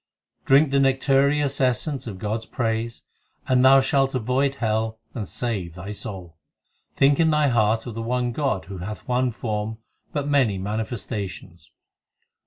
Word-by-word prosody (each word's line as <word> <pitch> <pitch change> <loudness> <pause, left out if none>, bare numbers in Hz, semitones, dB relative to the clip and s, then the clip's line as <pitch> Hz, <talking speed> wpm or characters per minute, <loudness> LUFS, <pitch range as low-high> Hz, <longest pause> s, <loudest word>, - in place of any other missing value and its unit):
Drink 140 +2 +5
the 140 - +3
nectareous 135 +1 +2
essence 130 +1 +1
of 100 -4 -6
God 105 +3 -2
s 110 - -12
praise, 115 -1 -2 0.4
And 130 -1 +3
thou 135 +1 +7
shalt 135 -1 +1
avoid 130 +3 0
hell 110 -2 -1 0.2
and 110 -7 -4
save 95 -9 -4
thy 95 +3 -7
soul. 95 -7 -7 0.6
Think 140 +1 +4
in 165 -1 +4
thy 150 -2 +3
heart 110 -1 +2
of 120 - -6
the 115 - -5
one 120 +1 -1
God 125 -6 -1
Who 95 -1 -8
hath 105 +9 -7
one 125 0 +1
form 110 -1 -3 0.3
but 145 -3 -2
many 130 -9 +2
manifestations. 100 -4 -5
120 Hz, 155 wpm, -24 LUFS, 105-135 Hz, 0.6 s, thou